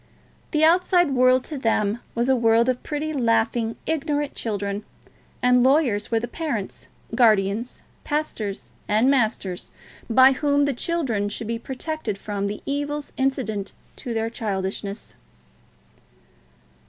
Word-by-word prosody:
The 310 -1 +1
outside 350 -1 +4
world 255 0 +4
to 300 -3 -6
them 225 -2 +1 0.2
was 235 +1 +1
a 265 - +4
world 230 0 +3
of 250 -1 -1
pretty, 310 +1 -3
laughing, 230 -2 +1
ignorant 295 -2 -1
children; 205 -2 -3 0.6
and 250 0 +5
lawyers 255 -6 +3
were 230 - +2
the 240 - -4
parents, 245 - -4 0.3
guardians, 215 -1 +2 0.2
pastors, 265 -10 -3 0.2
and 220 +6 +3
masters 215 -8 0 0.4
by 260 +3 +7
whom 285 +1 +2
the 285 - 0
children 245 - -1
should 215 +2 -5
be 230 +1 -3
protected 265 -3 -4
from 200 0 -3
the 205 +1 -5
evils 290 +1 -3
incident 255 -7 -2 0.2
to 240 -2 -5
their 225 0 -1
childishness. 200 -1 -4
240 Hz, 130 wpm, -23 LUFS, 215-285 Hz, 0.6 s, by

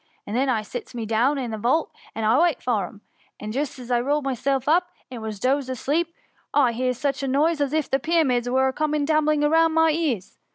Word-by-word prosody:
And 205 - -5
then 265 +2 +1
I 225 -4 +1
sits 245 +3 -8
me 230 -2 -3
down 235 +6 +2
i' 265 - -2
the 220 -2 -5
vault, 260 +9 +1 0.2
to 225 +4 +2
wait 340 -5 +2
for 215 -7 -1
'em, 210 0 -15 0.4
and 210 - -6
I'd - - -4
just 280 +1 -2
rolled 260 +5 +1
myself 270 0 -1
up, 350 +3 +3 0.2
and 240 -3 -7
was 215 -2 -5
dozed 265 +3 0
asleep, 300 +7 -1 0.4
when 290 - +5
I 245 - +3
hears 250 +1 -1
such 275 -1 -1
a 275 - -2
noise 295 +4 +1
as 280 -2 0
if 310 -1 0
the 270 - +1
Pyramids 265 -6 +1
were 260 +1 +2
all 265 - +2
coming 300 +1 -1
tumbling 305 -1 +2
about 325 +2 +4
my 320 0 +3
ears. 295 - -2
270 Hz, 230 wpm, -24 LUFS, 240-305 Hz, 0.4 s, when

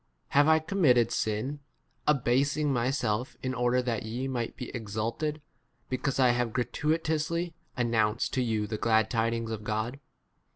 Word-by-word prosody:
k 140 - +5
Have 160 +2 +5
T - - -25
committed 135 - +4
sin, 110 +7 -1 0.5
abasing 140 +1 +2
myself 120 -2 0
in 130 0 -1
order 125 0 +2
that 120 -3 -1
ye 120 +4 -3
might 120 -3 -3
be 125 - -5
exalted, 115 +8 -3 0.5
because 130 +1 -1
I 130 -2 +6
have 120 -2 +1
gratuitously 160 +5 0 0.2
announced 115 -2 +1
to 130 - +1
8 - - +2
you 110 -2 0
the 105 +1 -4
glad 110 -2 +3
tidings 115 0 0
of 110 -1 -4
God 110 +5 -2
125 Hz, 155 wpm, -29 LUFS, 115-140 Hz, 0.5 s, I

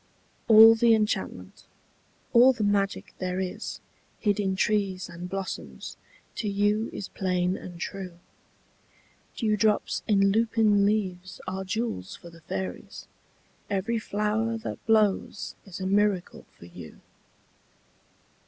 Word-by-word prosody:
All 225 0 +9
the 225 0 +4
enchantment, 215 0 -3 0.7
all 250 +2 +7
the 230 -4 -3
magic 200 -1 0
there 185 0 -2
is 185 -1 -4 0.4
Hid 205 -2 0
in 190 -2 0
trees 195 -2 0
and 175 +1 -8
blossoms, 85 - -6 0.4
to 215 - -2
you 205 +2 +1
is 195 - -6
plain 180 -1 -1
and 175 -3 -9
true. 185 -1 -6 1.2
Dewdrops 215 -2 +1
in 195 -2 +4
lupin 215 -2 +3
leaves 185 -4 -2
are 190 +1 -3
jewels 190 - -3
for 170 - -13
the 165 0 -16
fairies; 95 - -6 0.6
Every 205 +4 -1
flower 215 +2 -1
that 225 - -7
blows 215 -2 +1
is 185 -1 -8
a 190 - -4
miracle 200 -1 0
for - - -13
you. 85 -2 -12
200 Hz, 120 wpm, -27 LUFS, 185-215 Hz, 1.2 s, All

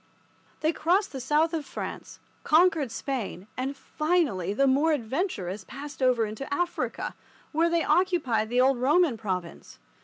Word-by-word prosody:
They 315 +2 +2
crossed 360 +7 +1
the 270 - -5
south 300 +6 +2
of 320 -2 -1
France, - - -7 0.2
conquered 320 -5 +3
Spain, 235 - -4
and, 270 +2 -3
finally, 300 - 0
the 275 +7 +2
more 285 +4 +3
adventurous 225 - -2
passed 275 +5 -9
over 250 -3 +3
into 220 +7 -7
Africa, 350 +4 -2 0.4
where 330 +2 +2
they 335 -1 +1
occupied 300 -13 +2
the 245 +1 +3
old 265 -1 +3
Roman 295 +2 +3
province. 185 -6 -5
275 Hz, 145 wpm, -27 LUFS, 230-325 Hz, 0.4 s, conquered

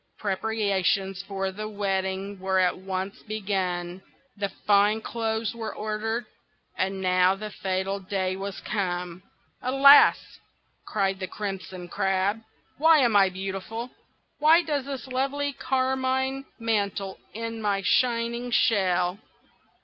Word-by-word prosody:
Preparations 195 -2 0
for 195 -1 -3
the 215 +3 -6
wedding 195 -1 -2
were 190 0 0
at 185 -1 +3
once 190 +1 -5
begun, 190 -4 -3 0.3
the 200 -1 -2
fine 205 +2 +3
clothes 225 0 -2
were 225 -1 -5
ordered, 220 +2 -2 0.5
and 190 0 -1
now 185 0 +3
the 210 +1 -7
fatal 190 0 -2
day 190 -1 -2
was 195 0 -6
come. 180 -3 -3 0.4
"Alas!" 275 +3 +6 0.5
cried 195 -2 0
the 185 - -3
Crimson 190 -3 -6
Crab, 195 +4 0 0.4
"why 320 +1 +6
am 240 -7 +3
I 195 -1 +6
beautiful? 195 +6 -5 0.5
Why 320 +4 +6
does 290 -5 -2
this 275 -2 -5
lovely 275 +2 -1
carmine 265 +1 0
mantle 200 -4 -1 0.2
in 230 0 -4
my 200 -2 0
shining 235 0 +1
shell? 190 -6 +2
200 Hz, 120 wpm, -26 LUFS, 190-230 Hz, 0.5 s, Alas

